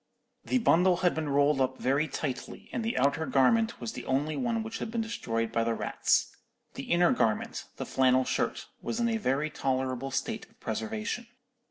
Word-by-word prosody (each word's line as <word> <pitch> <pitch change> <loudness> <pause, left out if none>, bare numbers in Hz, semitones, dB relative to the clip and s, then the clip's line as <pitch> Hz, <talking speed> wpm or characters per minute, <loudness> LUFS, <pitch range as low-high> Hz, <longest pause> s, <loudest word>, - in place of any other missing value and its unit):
"The 260 - +1
bundle 180 -6 +4
had 175 - +4
been 155 -2 -2
rolled 140 0 +3
up 130 0 0
very 140 +4 +1
tightly, 145 - -5
and 235 - -1
the 225 - -1
outer 140 +4 +2
garment 225 - +3
was 120 -2 -4
the - - -6
only 145 +4 0
one 235 -3 -1
which 225 0 -6
had - - -4
been 230 0 -1
destroyed 115 - -2
by 115 0 +1
the 115 0 0
rats. - - +1 0.4
The - - -6
inner 175 0 +5
garment—the 110 -2 -1
flannel 130 0 +3
shirt—was 225 - -3
in 235 - +2
a 225 -1 +1
very 150 -5 0
tolerable 130 -1 -1
state 220 +10 -3
of 225 +2 -29
preservation. 225 +2 -3
155 Hz, 180 wpm, -29 LUFS, -, 0.4 s, inner